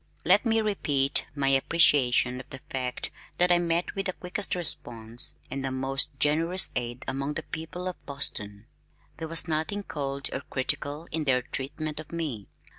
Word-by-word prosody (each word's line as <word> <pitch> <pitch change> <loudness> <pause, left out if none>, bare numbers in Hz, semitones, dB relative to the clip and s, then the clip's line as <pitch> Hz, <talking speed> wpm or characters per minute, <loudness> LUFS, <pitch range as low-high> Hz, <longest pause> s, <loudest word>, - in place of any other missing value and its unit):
Let 200 +7 +5
me 225 0 +3
repeat 145 -10 +1
my 135 -2 +1
appreciation 135 -3 +4
of 130 - -11
the 135 - -7
fact 125 -2 -2 0.3
that 180 0 +4
I 175 - +6
met 170 0 0
with 195 0 -3
the 185 - -1
quickest 185 +3 +1
response 120 -9 +1 0.2
and 135 +1 -3
the 135 - -1
most 135 +2 -1
generous 165 +5 +5
aid 120 +1 -4
among 140 +2 -3
the - - -3
people 175 +3 -6
of 180 - -6
Boston. 105 -7 -4 0.5
There 160 - -5
was 165 +2 +3
nothing 160 +6 -1
cold 140 -4 -4
or 135 - -3
critical 145 +4 -2
in 155 -1 -2
their 125 -2 +2
treatment 150 +4 -5
of 155 - -9
me. 150 - -4
145 Hz, 170 wpm, -27 LUFS, 130-170 Hz, 0.5 s, I